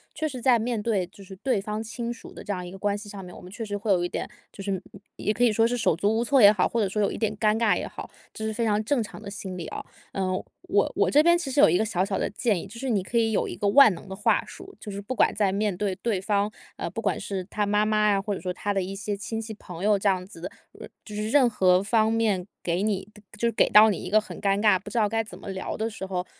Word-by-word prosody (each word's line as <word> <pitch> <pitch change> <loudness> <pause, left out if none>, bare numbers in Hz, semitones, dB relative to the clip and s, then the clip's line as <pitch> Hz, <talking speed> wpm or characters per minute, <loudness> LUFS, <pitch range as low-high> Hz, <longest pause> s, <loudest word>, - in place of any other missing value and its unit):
确 315 +1 -1
实 260 -3 -6
在 245 -1 +4
面 230 -1 -1
对 205 -5 0
就 195 +2 -15
是 190 0 -11
对 255 -1 0
方 210 +2 -4
亲 235 +1 -4
属 235 - -13
的 - - -10
这 205 - -3
样 180 -2 -5
一 175 - -8
个 195 - -9
关 205 0 0
系 205 0 -10
上 195 -2 -8
面， 180 - -11
我 - - -11
们 180 - -12
确 225 +3 -5
实 205 -1 -4
会 205 +1 -1
有 175 -2 +3
一 - - 0
点， - - -4 0.2
就 195 - -9
是， 200 - -2
嗯， 190 +1 -6
也 210 - -1
可 245 - 0
以 240 - +5
说 225 +2 +3
是 245 - -1
手 225 -9 +2
足 205 +6 +1
无 230 - +1
措 275 +2 +3
也 205 -3 +9
好， 200 -4 +2
或 235 - -1
者 205 - +2
说 210 +2 -1
有 200 - +1
一 - - -5
点 215 -2 -1
尴 215 0 +2
尬 230 - +3
也 - - -3
好， - - -9 0.2
这 220 - -6
是 220 - -2
非 230 +2 -1
常 210 -1 +2
正 260 +2 +1
常 210 - -7
的 215 - -10
心 190 -2 -6
理 170 - -5
哦。 - - -6 0.3
呃， 190 -1 -1 0.4
我 - - +2
我 - - +2
这 295 - +5
边 345 +1 +6
其 340 -5 -2
实 275 - 0
有 - - +8
一 175 +2 +3
个 - - +3
小 190 -4 0
小 195 -1 -2
的 - - -1
建 205 -3 0
议， - - -9
就 225 +4 -11
是 265 +1 -3
你 205 -4 +2
可 210 +6 -3
以 225 -1 +3
有 215 - 0
一 - - -5
个 205 - -1
万 225 +2 +8
能 170 - -12
的 190 - -6
话 210 - +2
术， 380 +1 -12
就 210 - -7
是 200 0 -5
不 210 +6 -5
管 - - +3
在 205 -2 +1
面 205 0 0
对 195 0 -1
对 210 -4 -2
方， 205 +1 0 0.3
呃， - - -3
不 - - -5
管 - - 0
是 195 -2 -4
他 210 +2 -2
妈 210 +1 +2
妈 215 0 +2
呀， 195 - +2
或 205 0 -2
者 - - -6
说 180 -1 -3
他 205 +3 -3
的 195 -2 0
一 195 +2 -5
些 205 +1 -3
亲 225 +2 -4
戚 220 0 -7
朋 180 -3 -9
友 210 0 +4
这 200 - -1
样 185 -2 +2
子 185 -2 -13
的， 185 - -5 0.3
呃， - - -8 0.2
就 210 - -9
是 215 +1 -2
任 260 -3 +5
何 185 -3 +3
方 220 +2 +2
面 210 -5 +1 0.2
给 175 +2 -1
你 205 -2 -1
的 210 - -15
就 235 +3 0
是 - - +1
给 - - +3
到 215 +1 +8
你 200 - 0
一 180 - -7
个 215 - +5
很 200 -4 -10
尴 200 0 +1
尬、 210 -3 +5
不 - - -10
知 235 - 0
道 210 - +2
该 225 +1 0
怎 215 - -12
么 200 - -8
聊 190 -1 -4
的 220 +1 -2
时 205 -3 -7
候， 185 -1 -3
210 Hz, 345 characters per minute, -26 LUFS, 195-225 Hz, 0.4 s, 也